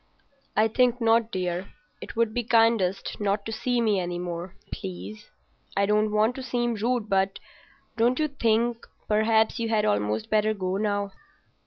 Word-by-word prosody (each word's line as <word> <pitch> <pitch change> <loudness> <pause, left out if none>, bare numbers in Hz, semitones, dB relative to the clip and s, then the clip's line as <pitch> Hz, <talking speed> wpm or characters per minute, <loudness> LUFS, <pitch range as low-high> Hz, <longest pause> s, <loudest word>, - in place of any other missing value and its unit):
"I 215 +1 +5
think 245 +2 +2
not, 230 0 +3
dear. 180 0 -2 0.3
It - - -8
would 230 -1 +1
be 245 0 -1
kindest 225 -5 +2
not 205 0 0
to 225 - -4
see 245 +2 0
me 215 -4 +2
any 175 -1 -3
more, 175 +1 -5 0.2
please. 210 +2 -7 0.5
I 200 - +4
don't 210 +1 +2
want 215 +3 +2
to - - -4
seem 240 -1 -1
rude, 230 +1 -1
but—don't 205 +4 -2
you 310 - +1
think—perhaps 225 -3 +1
you 230 -1 -1
had 215 -2 +2
almost 105 +1 0
better 215 0 +2
go 185 -1 -2
now." 205 -1 -1
215 Hz, 155 wpm, -26 LUFS, 195-230 Hz, 0.5 s, I